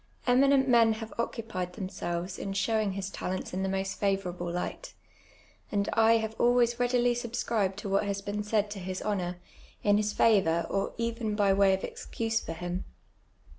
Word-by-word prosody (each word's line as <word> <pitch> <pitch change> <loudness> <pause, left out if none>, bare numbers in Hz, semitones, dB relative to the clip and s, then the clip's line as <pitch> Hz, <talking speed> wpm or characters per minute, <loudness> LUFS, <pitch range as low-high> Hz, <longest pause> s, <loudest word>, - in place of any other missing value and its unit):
Eminent 270 +2 +4
men 230 -3 +5
have 220 0 -7
occupied 220 -6 -3
themselves 180 -2 -4
in 195 - -4
showing 215 0 +1
his 195 0 -4
talents 185 -1 -4
in 185 - -2
the 190 - 0
most 195 0 -2
favourable 185 -3 -1
light; 340 - -5 0.8
and 200 -1 0
I 225 0 +5
have 220 -1 -3
always 240 0 +3
readily 245 0 +3
subscribed 230 -5 -1
to 205 - -5
what 195 +2 +2
has 200 -1 -2
been 205 +1 -3
said 210 0 0
to 205 - -5
his 185 0 -5
honour, 180 -4 -2 0.5
in 205 0 +4
his 210 0 0
favour, 170 -8 +3
or 195 - -1
even 230 -2 -2
by 200 -2 +3
way 195 0 +4
of 190 - -8
excuse 225 -1 -2
for 165 - -6
him. 175 +2 -4
205 Hz, 170 wpm, -29 LUFS, 190-230 Hz, 0.8 s, men